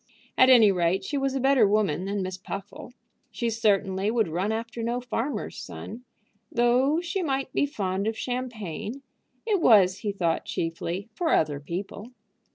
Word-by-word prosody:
At 255 - +6
any 230 -5 +7
rate, 180 +1 +1
she 295 - -4
was 275 -1 0
a - - 0
better 265 -4 +4
woman 195 -5 +1
than 200 0 -2
Miss 185 0 -4
Puffle. 195 +5 -8 0.4
She 235 -2 -2
certainly 200 -3 +1
would 225 -2 +1
run 180 +6 -1
after 230 +1 -4
no 235 +2 -1
farmer's 250 +2 -3
son. 245 +3 -8 0.5
Though 250 +7 +3
she 350 +2 -2
might 270 -5 -2
be 285 - +2
fond 200 -6 -2
of 220 0 -2
champagne, 245 - -5 0.4
it 415 -5 +1
was, 195 - +5
he 210 - -2
thought, 170 -4 -1
chiefly 170 +3 -3
for 330 +7 -1
other 145 -3 +1
people. 185 +8 -6
220 Hz, 165 wpm, -26 LUFS, 190-255 Hz, 0.5 s, any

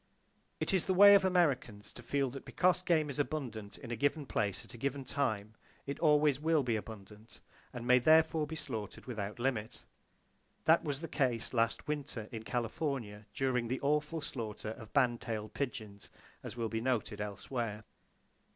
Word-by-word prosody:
It - - 0
is 190 - +2
the 190 - +1
way 200 +2 +10
of 200 -1 +7
Americans 135 - +1
to - - -10
feel 135 +2 0
that 135 +1 -8
because 180 +7 +2
game 165 -4 +2
is 140 - -6
abundant 120 -9 -3
in 120 -4 -9
a - - -1
given 145 +5 0
place 100 -6 -1
at - - -13
a - - -9
given 140 +1 -2
time, 110 -7 -1 0.3
it 140 0 -4
always 150 -3 +4
will 155 -1 +2
be 120 -3 0
abundant, 105 0 -9 0.3
and 120 -1 -6
may 125 +1 +6
therefore 160 +2 +4
be 160 - -5
slaughtered 110 -9 -6
without 105 -4 -4
limit. 120 -3 -2 0.8
That 160 +1 +5
was 145 -2 -3
the 165 - -4
case 130 -6 0
last 115 -1 +1
winter 145 -7 -3
in 115 -2 -5
California 115 -2 -3
during 125 -3 +1
the 130 +3 -2
awful 150 +3 0
slaughter 110 -6 -5
of 110 -1 -10
band 120 -3 +2
tailed 110 -2 -4
pigeons, 110 -7 -5 0.3
as - - -8
will 115 -1 -1
be 110 0 -2
noted 115 -4 -1
elsewhere. 105 +1 -4
125 Hz, 175 wpm, -33 LUFS, 110-150 Hz, 0.8 s, way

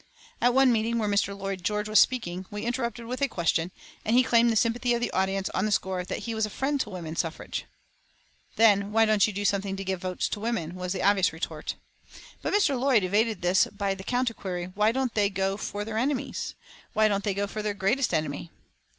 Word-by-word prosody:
At 245 0 +3
one 265 -1 +6
meeting 230 0 +1
where 215 -2 0
Mr. 200 -1 +1
Lloyd 195 -2 -4
George 210 +2 -1
was 215 -1 +5
speaking, 185 -7 +1
we 210 0 -5
interrupted 235 -1 -2
with 250 +3 -5
a 280 - +3
question, 170 -4 0 0.3
and 225 - +1
he 255 - +6
claimed 235 -1 +4
the - - 0
sympathy 235 +3 +2
of - - -1
the 240 - -2
audience 190 0 0
on 190 +3 0
the - - -2
score 190 -2 0
that 180 - -5
he 230 - -3
was 220 0 -1
a 215 - 0
friend 275 +5 -1
to 210 - -3
woman 170 -4 -6
suffrage. 165 -1 -3 0.9
"Then 205 -2 +4
why 225 +1 +4
don't 215 -1 +4
you - - -2
do 205 +1 -3
something 200 -1 0
to 195 - -5
give 190 -2 -3
votes 185 -1 -1
to - - -3
women?" 205 -7 -2
was 180 0 -4
the 185 - -3
obvious 195 -2 +4
retort. 160 -1 -5 0.7
But - - -2
Mr. 405 -6 +4
Lloyd 255 -5 +3
George 185 - -1
evaded 215 +1 +1
this 180 +2 +4
by 200 -1 -2
the 190 0 -9
counter 245 +2 0
query: 180 -3 -5
"Why 210 +2 +3
don't 260 -1 -1
they 205 -2 +2
go 195 0 -1
for 205 0 -4
their 220 0 -2
enemies? 265 +1 -2 0.4
Why 215 0 +4
don't 200 -1 0
they 200 -2 -1
go 200 +1 0
for 215 +2 -5
their 210 -1 -2
greatest 225 +8 +1
enemy?" 155 0 -2
205 Hz, 230 wpm, -27 LUFS, 190-230 Hz, 0.9 s, one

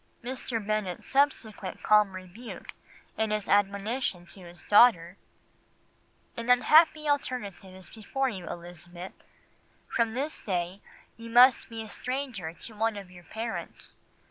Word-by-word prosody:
'" - - -37
Mr. 250 -1 -4
Bennet's 210 -4 -2
subsequent 250 -8 0
calm 210 -2 +4
rebuke 185 +6 -9 0.5
in 220 0 +1
his 210 -1 -2
admonition 200 0 0
to 195 - -11
his 175 -2 -12
daughter, 200 -6 +5 1.2
"'An 235 +1 -5
unhappy 305 +5 +5
alternative 245 -9 -2
is 185 -1 -10
before 265 +5 -3
you, 190 -8 -5
Elizabeth. 175 +1 -9 0.7
From 230 -1 0
this 285 +4 -3
day 185 0 -3 0.4
you 230 0 -9
must 245 +2 +6
be 225 -1 -6
a - - -10
stranger 250 -7 -4
to 220 +6 -9
one 220 0 -1
of 195 -3 -9
your 175 -1 -14
parents. 225 +4 -6
215 Hz, 135 wpm, -28 LUFS, 185-245 Hz, 1.2 s, must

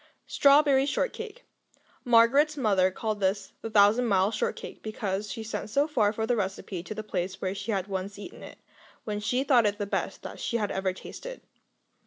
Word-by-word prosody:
Strawberry 280 -1 +4
Shortcake 485 - -3 0.6
Margaret's 255 +6 +4
mother 200 -7 +3
called 215 +2 -3
this 195 0 -1
the 225 - -5
Thousand 215 +3 +4
Mile 195 -1 +3
Shortcake, 215 - -4
because 210 -1 -3
she 225 - -5
sent 220 -1 -5
so 280 +7 +2
far 225 -9 +2
for 220 +1 -2
the 245 - +1
recipe 195 -3 -3
to 215 +5 -7
the 215 - -5
place 185 -2 -3
where 185 0 -2
she 200 +3 -4
had 195 -3 -1
once 195 0 -4
eaten 205 - -10
it, - - -11 0.5
when 210 -1 -3
she 250 +5 0
thought 245 -6 +4
it 205 0 -1
the 205 - -2
best 200 - -3
she 235 - -1
had 210 -3 -1
ever 190 0 0
tasted. - - -9
215 Hz, 185 wpm, -28 LUFS, 195-250 Hz, 0.6 s, Strawberry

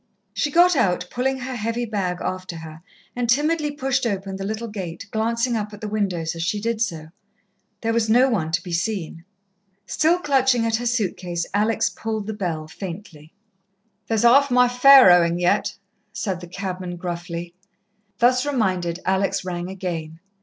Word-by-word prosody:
She 295 - 0
got 350 +3 +5
out, 180 -8 +1
pulling 265 +2 -1
her 255 +1 -4
heavy 230 +1 -2
bag 195 -5 -2
after 185 -1 -4
her, 160 -1 -10 0.3
and 245 -1 -2
timidly 300 +4 +2
pushed 270 -3 -1
open 195 -2 -3
the 195 - -5
little 220 +3 -4
gate, 190 -3 -6
glancing 230 +2 0
up 210 -1 -3
at - - -14
the 215 - -4
windows 185 -6 -1
as 165 - -6
she 190 +5 -1
did 225 +1 -2
so. 165 -7 -2 0.7
There 225 0 0
was 225 -1 +1
no 245 +4 +5
one 180 -11 -1
to 170 0 0
be 180 - -7
seen. 170 -2 -3 0.6
Still 320 +3 +2
clutching 265 -7 +2
at 225 -1 +1
her 240 +1 -3
suit 225 -6 0
case, 175 -2 -3
Alex 215 +2 +2
pulled 220 -2 -4
the 220 - -4
bell 170 -7 -3
faintly. 165 -3 -9 0.7
"There's 225 0 0
half 275 +4 +6
my 250 0 +5
fare 250 -3 +8
owing 170 -1 +4
yet," 195 +3 +1 0.4
said 190 -2 -3
the 175 - -9
cabman 180 -1 -5
gruffly. 175 -1 -5 0.6
Thus 250 +1 +3
reminded, 185 -11 -1
Alex 190 0 0
rang 175 0 -4
again. 165 -4 -5
205 Hz, 170 wpm, -22 LUFS, 175-240 Hz, 0.7 s, fare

